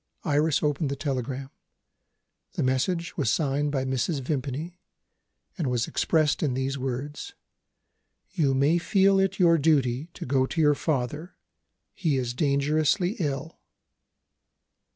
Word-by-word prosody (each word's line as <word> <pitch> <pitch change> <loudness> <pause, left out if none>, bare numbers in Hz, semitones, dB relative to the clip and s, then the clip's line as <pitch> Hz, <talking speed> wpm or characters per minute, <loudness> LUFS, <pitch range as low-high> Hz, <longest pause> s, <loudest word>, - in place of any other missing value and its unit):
Iris 150 0 +2
opened 150 0 0
the 140 - -2
telegram. 135 -1 -4 1.0
The - - -1
message 165 +7 -1
was 140 -8 +1
signed 145 +1 0
by 135 -2 -1
Mrs. 130 +4 -1
Vimpany, 145 +5 -4 0.8
and 155 - 0
was 120 -1 0
expressed 155 -2 +1
in 140 -5 0
these 130 +1 -1
words: 135 +2 -5 1.0
"You 150 -7 +1
may 145 +6 +3
feel 195 +1 +3
it 195 0 +1
your 170 -3 +4
duty 140 -2 +2
to - - -6
go 130 0 +1
to 165 - -4
your 150 -2 +5
father. 150 +3 -3 0.6
He 160 -8 0
is 125 -2 -2
dangerously 155 - +1
ill." 145 -1 -3
145 Hz, 130 wpm, -26 LUFS, 130-160 Hz, 1.0 s, your